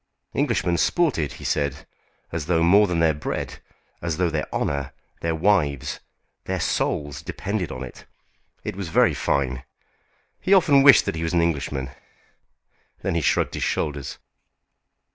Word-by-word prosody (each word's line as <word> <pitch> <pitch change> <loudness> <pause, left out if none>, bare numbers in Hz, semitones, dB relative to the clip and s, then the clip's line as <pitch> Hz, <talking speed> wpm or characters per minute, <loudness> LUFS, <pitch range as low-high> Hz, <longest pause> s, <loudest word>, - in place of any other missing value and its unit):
Englishmen 85 -1 +1
sported, 105 - +1
he - - -11
said, 70 -1 -1 0.5
as 80 -2 -4
though 85 -1 +2
more 100 +5 +6
than 90 -2 -1
their 80 -1 +3
bread, 75 - -4 0.4
as 85 -2 -2
though 90 -2 +1
their 75 -2 -3
honour, 70 -1 -2 0.3
their 80 -1 -1
wives, 75 -7 +1 0.5
their - - -2
souls, 75 -1 -1
depended 100 +3 -3
on 65 0 -5
it. 65 - -11 0.6
It 105 - -4
was 95 -2 -5
very - - +4
fine! 65 -2 -1 0.8
He 195 - +4
often 150 -7 +5
wished 135 0 +8
that - - -1
he 80 - -4
was 80 +1 -2
an 85 - +4
Englishman. 70 -4 -2 1.1
Then - - 0
he 85 - +1
shrugged - - +1
his - - -4
shoulders. 70 -3 -2
80 Hz, 150 wpm, -24 LUFS, 70-90 Hz, 1.1 s, wished